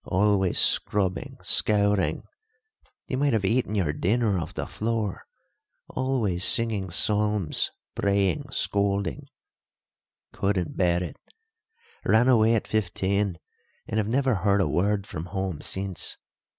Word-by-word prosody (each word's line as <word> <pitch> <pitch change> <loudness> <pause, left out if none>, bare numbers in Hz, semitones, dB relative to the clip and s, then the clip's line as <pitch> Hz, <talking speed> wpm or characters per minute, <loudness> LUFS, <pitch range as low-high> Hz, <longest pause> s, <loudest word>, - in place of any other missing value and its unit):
Always 95 -1 +1
scrubbing, 95 -3 +2
scouring 100 -2 +2 0.8
you 130 - -2
might 140 -2 +2
have 105 -3 +1
eaten 110 +1 0
your 85 -7 0
dinner 105 +4 +1
off 80 - -6
the - - -3
floor; 110 -3 -3 0.6
always 120 -9 -1
singing 110 -4 +2
psalms 105 -1 +1 0.2
praying 100 +8 0
scolding. 100 -6 -1 1.1
Couldn't 95 -4 -1
bear 90 -1 +1
it; 90 - -7 0.9
ran 115 +3 +3
away 115 -2 +4
at 110 - -1
fifteen, 100 -2 -1 0.5
and 110 - -1
have 105 - -1
never 130 -1 +1
heard 100 +2 +2
a 95 - +2
word 100 +2 0
from 80 -5 -6
home 95 -4 -4
since. 95 -4 -2
100 Hz, 120 wpm, -26 LUFS, 95-110 Hz, 1.1 s, away